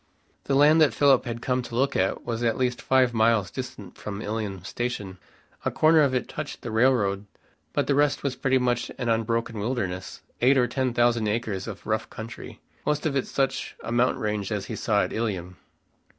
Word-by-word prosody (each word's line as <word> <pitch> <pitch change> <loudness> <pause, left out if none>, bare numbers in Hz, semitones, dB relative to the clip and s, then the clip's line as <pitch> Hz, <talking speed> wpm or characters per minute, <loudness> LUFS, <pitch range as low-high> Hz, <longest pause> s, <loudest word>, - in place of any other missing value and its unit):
The 135 - +1
land 150 +3 +6
that 150 - +4
Philip 140 -3 +4
had 115 0 -5
come 125 0 +1
to 120 -1 -8
look 135 +3 +1
at 95 +1 0
was 115 -1 -3
at 115 -2 +1
least 125 -1 0
five 130 -2 +3
miles 110 -4 +2
distant 115 -8 -8
from 100 -1 -5
Ilium 105 -4 -4
station. 100 -4 -4 0.4
A - - +1
corner 155 0 +4
of 135 -3 +2
it 125 - -1
touched - - -6
the 120 - -4
railroad, 110 -4 +2 0.4
but - - 0
the 145 - +1
rest 145 0 +2
was 140 -2 -1
pretty 130 -1 +2
much 125 -1 0
an 120 - -2
unbroken 115 0 0
wilderness, 100 -5 -3 0.2
eight 135 +3 +5
or 125 - +4
ten 130 0 -1
thousand 120 -2 +3
acres 105 -3 -2
of 105 -3 -8
rough 110 0 -1
country, 110 0 -9 0.2
most 150 +1 -1
of 150 -3 0
it 135 - 0
such 135 -1 -1
a - - -5
mountain 120 0 +1
range 105 -1 -2
as 100 -2 -2
he - - -5
saw 105 -5 +1
at - - -4
Ilium. 95 -6 -3
120 Hz, 200 wpm, -26 LUFS, 105-130 Hz, 0.4 s, land